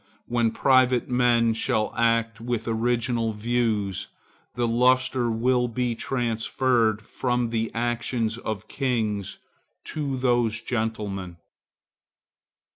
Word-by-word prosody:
When 120 -1 +1
private 130 0 +3
men 120 -2 +3
shall 110 -1 0
act 115 -1 +1
with 115 -1 -3
original 115 0 0
views, 105 -4 -1 0.5
the 120 -1 0
lustre 125 +1 +2
will 125 +2 +1
be 120 0 -1
transferred 115 -2 0
from 125 +1 -1
the 115 -1 -1
actions 120 -1 -1
of 110 -2 -5
kings 110 -7 -2 0.5
to 140 -4 -3
those 120 -3 +1
of - - -19
gentlemen. 105 -6 -3
115 Hz, 105 wpm, -25 LUFS, 110-125 Hz, 0.5 s, private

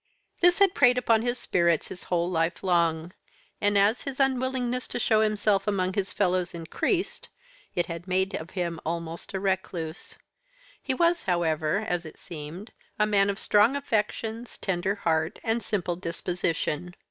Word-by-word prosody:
"This 355 0 +5
had 395 -2 +5
preyed 250 -6 +5
upon 230 -3 +3
his 240 +1 -1
spirits 170 -8 +1
his 180 - -9
whole 175 -1 0
life 165 0 -1
long; 170 -2 +1 0.5
and, 205 0 +3
as 205 +4 +3
his 275 -1 -6
unwillingness 260 -2 0
to - - -4
show 220 -2 +3
himself 210 -2 +1
among 185 -2 +1
his 195 -1 -1
fellows 180 -3 0
increased, 340 - -2 0.5
it 175 - +1
had 170 +2 -7
made 190 +1 +1
of 170 -3 -5
him 170 -2 -1
almost 165 +2 -4
a - - 0
recluse. 185 -4 -3 0.6
He 265 - -1
was, 340 +2 +2
however, 165 -2 +1
as 175 -1 -1
it 160 - -11
seemed, 170 +6 -8 0.3
a 210 - +3
man 200 -1 +3
of 200 - -1
strong 210 +6 +4
affections, 225 -2 -2
tender 190 +1 -1
heart, 160 -3 0
and 225 0 0
simple 180 -6 -2
disposition. 175 -1 -2
190 Hz, 160 wpm, -27 LUFS, 170-225 Hz, 0.6 s, This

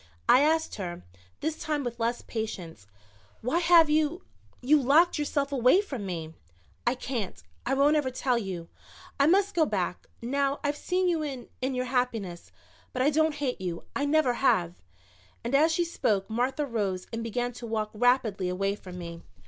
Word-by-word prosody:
I 255 - +7
asked 320 -1 +1
her, 175 - -5 0.4
this 315 0 -2
time 300 -2 -1
with 240 -1 -5
less 235 +1 -1
patience. 180 - -6 0.5
"Why 255 +9 +1
have 340 -2 +6
you 310 +4 +1 0.4
you 290 +4 +4
locked 305 +6 +4
yourself 285 -1 -1
away 255 +6 +5
from 265 - -4
me?" 165 -3 -5 0.5
"I 240 - +3
can't 245 -6 -4 0.3
I 270 - +2
won't 285 +3 +4
ever 295 -4 +1
tell 255 0 0
you. 185 -6 -5 0.5
I 280 - +5
must 395 +4 +3
go 335 - +3
back, - - -2
now 275 +3 0
I've 290 0 0
seen 365 +4 0
you 335 -3 +1
in 275 -5 -5
in 260 +1 -1
your 255 0 -1
happiness. 235 -9 -2 0.4
But 255 - 0
I 290 - +4
don't 315 0 +2
hate 270 -8 -2
you 175 -2 -4
I 285 - 0
never 290 -3 +3
have." 180 -10 +2 0.7
And 235 +3 -3
as 310 +4 +5
she 345 +2 +1
spoke 220 - 0
Martha 255 +6 0
rose 200 -7 -2
and 230 - -2
began 245 +2 -2
to 235 0 -8
walk 215 -1 -2
rapidly 220 -5 +2
away 195 +2 0
from 185 -3 -10
me. 170 -1 -7
255 Hz, 180 wpm, -28 LUFS, 215-300 Hz, 0.7 s, I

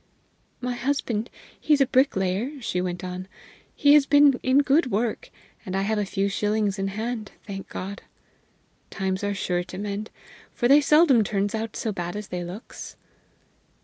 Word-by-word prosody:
"My 250 0 -2
husband 240 -3 -2 0.3
he's 300 -2 +3
a 275 - +5
bricklayer," 250 0 +1
she 180 -7 -2
went 180 0 -4
on; 185 0 -5 0.5
"he 285 0 +5
has 295 -1 +6
been 285 -2 +5
in 265 +3 +4
good 280 0 +3
work, 225 +1 -1 0.3
and 185 - -5
I 195 - +1
have 215 +1 0
a 205 - -1
few 195 +1 0
shillings 210 0 0
in 195 - 0
hand, 220 +2 -4
thank 195 -2 -7
God! 195 +2 -6 0.9
Times 190 0 -2
are 205 0 -1
sure 180 -2 -1
to 185 - -9
mend, 205 +2 -4 0.5
for 240 - +1
they 285 +3 +7
seldom 290 -5 +5
turns 200 0 -1
out 220 0 -3
so 220 - -2
bad 175 -2 -4
as 210 -1 -6
they 180 -1 -3
looks." 180 +6 -9
210 Hz, 170 wpm, -25 LUFS, 195-255 Hz, 0.9 s, they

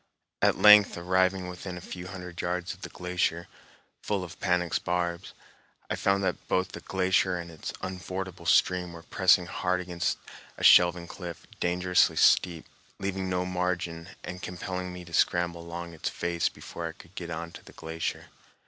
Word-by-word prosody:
At - - +4
length 105 -2 +8
arriving 95 +1 +1
within 90 0 -6
a - - -5
few 90 0 -8
hundred 90 -2 -7
yards 90 +1 -2
of 95 - -16
the - - -6
glacier, 90 -1 -1 0.5
full 100 -3 -1
of 85 - -10
panax 90 -2 +1
barbs, 85 0 -2 0.6
I - - +1
found 100 0 +1
that - - -2
both 95 0 +1
the - - -7
glacier 95 -1 +1
and 85 -1 -7
its 80 - -6
unfordable 95 0 -5
stream 90 -1 +3
were 85 0 -10
pressing 95 0 +4
hard 90 +1 -1
against 90 -1 -1 0.4
a - - -7
shelving 85 -1 +7
cliff, 85 -1 -8
dangerously 90 +1 +3
steep, 85 -3 +4 0.3
leaving 95 -1 -2
no 90 0 0
margin, 90 -2 -2
and 90 0 -6
compelling 90 +1 -4
me 90 0 -8
to 85 - -13
scramble 85 -1 +2
along 85 0 -7
its 80 - -3
face 85 -1 -1
before 85 -1 -7
I 80 - -6
could 85 - -17
get 85 -3 -6
on 85 0 -5
to - - -12
the - - -15
glacier. 80 0 -4
90 Hz, 170 wpm, -28 LUFS, 85-90 Hz, 0.6 s, length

